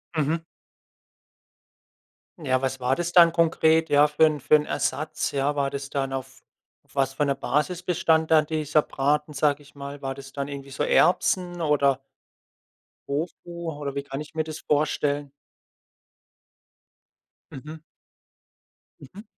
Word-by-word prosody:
Mhm. 160 +2 0 2.0
Ja, 130 -3 0
was 130 0 -1
war 125 +1 +1
das 175 0 -2
dann 170 -2 +7
konkret, 160 -1 +3
ja, 145 +1 +6
für 150 +2 +4
'n 155 -2 +1
für 145 +3 +4
'n 150 0 +2
Ersatz, 155 +1 -2
ja? 140 +1 0
War 140 -1 0
das 140 0 -6
dann 135 -1 -2
auf 130 0 -6 0.4
auf - - -26
was 135 -1 +1
für 145 - 0
'ner 140 -1 0
Basis 150 +6 -1
bestand 165 -3 +1
dann 155 -1 +5
dieser 155 -1 +1
Braten, 150 +3 -1
sag 145 -1 +1
ich 145 - -18
mal? 140 0 -8
War 135 0 -4
das 135 -1 -11
dann 140 -1 -3
irgendwie 140 -1 -8
so 140 - -5
Erbsen, 180 -1 +2
oder 140 -3 +2 1.1
Tofu 170 +3 -4
oder 145 -1 -5
wie 140 - -2
kann 140 +1 -6
ich 150 - -10
mir 160 0 0
das 155 0 -7
vorstellen? 145 -1 0 2.2
Mhm. 155 +4 -9 1.2
Mhm. 190 +10 -12
150 Hz, 145 wpm, -25 LUFS, 140-160 Hz, 2.2 s, dann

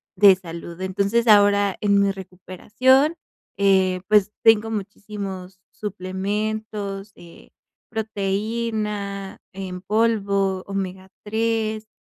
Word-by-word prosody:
de 200 -2 +7
salud. 170 -1 -9
Entonces, 200 +5 0
ahora, 205 -2 +5
en 200 -1 +3
mi 200 0 +2
recuperación, 205 - +1 0.4
eh, 190 -2 +3
pues 210 -1 +4
tengo 225 -1 +5
muchísimos 195 -3 -6
suplementos, 205 +1 -4
eh, 170 -1 -15 0.4
proteína 210 -1 -3
en 185 -1 -6
polvo, 200 -2 +1
omega 190 -1 -4
3, 220 0 -1
200 Hz, 90 wpm, -22 LUFS, 190-215 Hz, 0.4 s, de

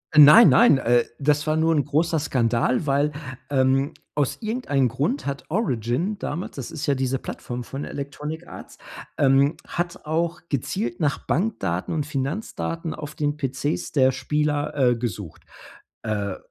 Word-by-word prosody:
Nein, 150 +10 +9
nein, 235 - +6
äh, 120 0 +3
das 150 +1 +1
war 155 0 +1
nur 160 +1 +2
'n 145 - +1
großer 160 +3 +1
Skandal, 125 0 0
weil, 145 +2 +2 0.4
ähm, 135 +2 +2 0.2
aus 145 -3 0
irgendeinen 215 - 0
Grund 145 - -1
hat 140 0 -4
„Origin“ 165 - -1
damals, 170 +1 -5
das 135 -4 -6
ist 150 - -5
ja 140 - +3
diese 130 0 -1
Plattform 125 0 -6
von 135 +4 -6
„Electronic 150 +4 -6
Arts“, - - -11 0.4
ähm, 140 +2 +4
hat 175 -1 -4
auch 170 +2 -1
gezielt 120 -3 -2
nach 145 -3 0
Bankdaten 145 - -1
und 150 -3 -2
Finanzdaten 160 +3 -3
auf 150 -1 -7
den 145 0 -2
PCs 135 +2 -2
der 130 -2 +4
Spieler, 150 +2 -1
äh, 125 -4 +3
gesucht. 105 -7 -6 0.6
Äh. 100 -3 -2
145 Hz, 150 wpm, -24 LUFS, 130-160 Hz, 0.6 s, Nein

